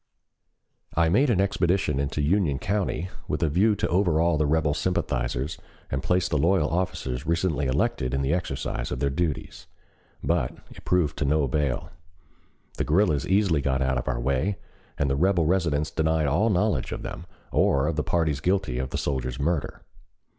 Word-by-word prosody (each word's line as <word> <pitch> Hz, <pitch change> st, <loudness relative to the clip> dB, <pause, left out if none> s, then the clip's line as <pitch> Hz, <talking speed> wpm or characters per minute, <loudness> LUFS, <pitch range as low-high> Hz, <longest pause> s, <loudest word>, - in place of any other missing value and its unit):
I 85 Hz, -1 st, +4 dB
made 130 Hz, -, +3 dB
an 105 Hz, -6 st, +2 dB
expedition 90 Hz, -6 st, +1 dB
into 70 Hz, +1 st, -1 dB
Union 80 Hz, -3 st, +2 dB
County 95 Hz, 0 st, -2 dB, 0.2 s
with -, -, -1 dB
a 80 Hz, -, +2 dB
view 100 Hz, +8 st, +3 dB
to -, -, -1 dB
overawe 85 Hz, -3 st, +2 dB
the 75 Hz, -1 st, +1 dB
rebel 75 Hz, -1 st, +2 dB
sympathizers 65 Hz, -4 st, -2 dB, 0.3 s
and 65 Hz, -, -1 dB
place 90 Hz, +4 st, +1 dB
the 75 Hz, -, 0 dB
loyal 85 Hz, -1 st, +2 dB
officers 80 Hz, -7 st, -2 dB
recently 85 Hz, -4 st, 0 dB
elected 65 Hz, -1 st, 0 dB
in 65 Hz, +1 st, 0 dB
the 70 Hz, +4 st, +1 dB
exercise 80 Hz, -7 st, -3 dB
of 60 Hz, -, -2 dB
their 70 Hz, 0 st, 0 dB
duties. 80 Hz, 0 st, -3 dB, 0.6 s
But -, -, 0 dB, 0.2 s
it -, -, -13 dB
proved 80 Hz, -5 st, +1 dB
of 70 Hz, -, +1 dB
no 75 Hz, +1 st, +2 dB
avail. 70 Hz, -1 st, -1 dB, 0.9 s
The -, -, 0 dB
guerrillas 75 Hz, -3 st, +2 dB
easily 95 Hz, -6 st, +2 dB
got 65 Hz, -1 st, 0 dB
out 65 Hz, -1 st, +1 dB
of -, -, -7 dB
our -, -, -1 dB
way 70 Hz, +10 st, 0 dB, 0.4 s
and 70 Hz, -, +1 dB
the 70 Hz, -, +1 dB
rebel 85 Hz, +2 st, +2 dB
residents 80 Hz, -4 st, +1 dB
denied 80 Hz, -1 st, +1 dB
all 105 Hz, +10 st, +2 dB
knowledge 100 Hz, -, +1 dB
of -, -, -5 dB
them -, -, -7 dB, 0.2 s
or 70 Hz, 0 st, +3 dB
of 80 Hz, 0 st, -1 dB
the 75 Hz, -, +1 dB
parties 80 Hz, -5 st, 0 dB
guilty 90 Hz, -7 st, 0 dB
of 65 Hz, 0 st, -3 dB
the -, -, -3 dB
soldier's 65 Hz, -2 st, -2 dB
murder. 75 Hz, 0 st, -2 dB
75 Hz, 175 wpm, -26 LUFS, 70-90 Hz, 0.9 s, I